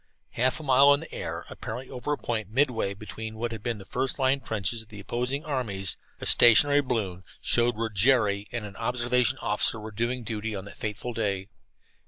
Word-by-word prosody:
Half 130 +5 +1
a - - -8
mile 140 +1 +6
in 140 - -6
the 165 - -10
air, - - -5
apparently 125 +4 -7
over 125 +3 -4
a - - -2
point 110 -4 -3
midway 115 -5 +1
between 110 +2 -7
what 120 +1 -2
had 110 -2 -6
been 120 0 -2
the 95 - -11
first 130 +5 -1
line 135 0 +2
trenches 110 -1 -2
of 110 - -14
the 105 -2 -11
opposing 125 - -2
armies, 105 -10 -1 0.2
a - - -6
stationary 145 +5 +7
balloon 105 -9 -2 0.2
showed 120 -1 +2
where 115 0 0
Jerry 105 -1 +2
and 120 -3 -4
an 100 -2 -9
observation 125 +2 +1
officer 105 +2 +1
were 110 +1 -8
doing 120 +3 -2
duty 110 -1 -4
on 95 0 -6
that 100 - -12
fateful 105 +3 -4
day. 100 -3 -2
115 Hz, 200 wpm, -27 LUFS, 105-125 Hz, 0.2 s, stationary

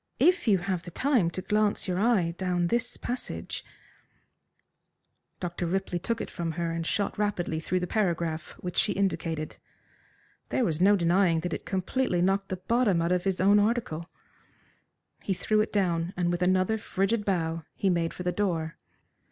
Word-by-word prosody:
"If 360 -6 +3
you 200 -3 +5
have 180 -1 -2
time 255 -11 +3
to 185 +2 -6
glance 210 -1 +1
your 180 0 0
eye 200 -7 +2
down 180 -2 0
this 240 +1 -1
passage 250 +1 -4 1.0
" - - -50
Dr. 175 -1 -3
Ripley 185 0 -1
took 230 +6 -2
it - - -4
from 165 -2 -3
her 170 0 -2
and 165 0 -2
shot 205 0 -1
rapidly 180 -6 0
through 180 +3 -1
the - - 0
paragraph 170 -5 -1
which 180 -1 -6
she 205 - +3
indicated. 165 -5 -2 0.9
There 255 - +1
was 165 -3 -1
no 200 +2 +6
denying 170 -2 +3
that 175 +1 -3
it - - -5
completely 190 +1 0
knocked 195 +1 +1
the 185 - -2
bottom 205 0 +2
out 170 +1 +1
of 180 0 +1
his 190 -2 0
own 200 +2 +5
article. 205 -7 0 1.1
He 195 - -1
threw 215 +3 +2
it 215 - -2
down, 175 -3 0
and 175 -1 +1
with 175 0 -2
another 185 +4 +2
frigid 205 +2 0
bow 165 -5 -1
he 195 - +1
made 170 -1 0
for 180 - -7
the 180 - +1
door. 170 -5 -1
185 Hz, 175 wpm, -28 LUFS, 170-205 Hz, 1.1 s, no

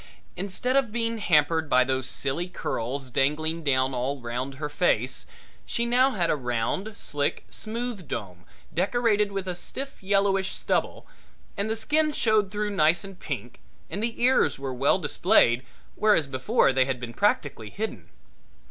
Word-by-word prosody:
Instead 200 +7 -2
of 270 -5 +2
being 230 0 -1
hampered 160 -3 +2
by 130 - +5
those 130 0 -1
silly 140 +8 -1
curls 130 -6 -4
dangling 155 +5 0
down 130 -2 +2
all 130 +3 -2
round 125 +3 -4
her 150 +2 -3
face, - - 0 0.4
she 235 - -1
now 250 +3 +4
had 175 -4 +1
a - - +2
round, 130 - -2
slick, 145 -1 -2
smooth 225 -5 -5
dome 90 -5 -6 0.3
decorated 210 +2 +2
with 195 -1 -3
a 180 - -1
stiff 270 +10 -7
yellowish 195 -1 +2
stubble, - - -1 0.5
and 200 +1 -1
the 220 - 0
skin 305 +7 +1
showed 220 -7 +2
through 210 +1 -2
nice 170 -1 +3
and 195 -2 -10
pink 125 -5 -6 0.3
and 200 - -3
the 230 0 -2
ears 260 +1 +4
were 135 -1 -4
well 135 +3 +3
displayed, 120 +2 +3 0.3
whereas 210 -8 +3
before 130 0 +2
they 130 0 +3
had 130 -2 -2
been 120 -1 -6
practically 145 - 0
hidden. 220 - -5
170 Hz, 155 wpm, -26 LUFS, 130-215 Hz, 0.5 s, by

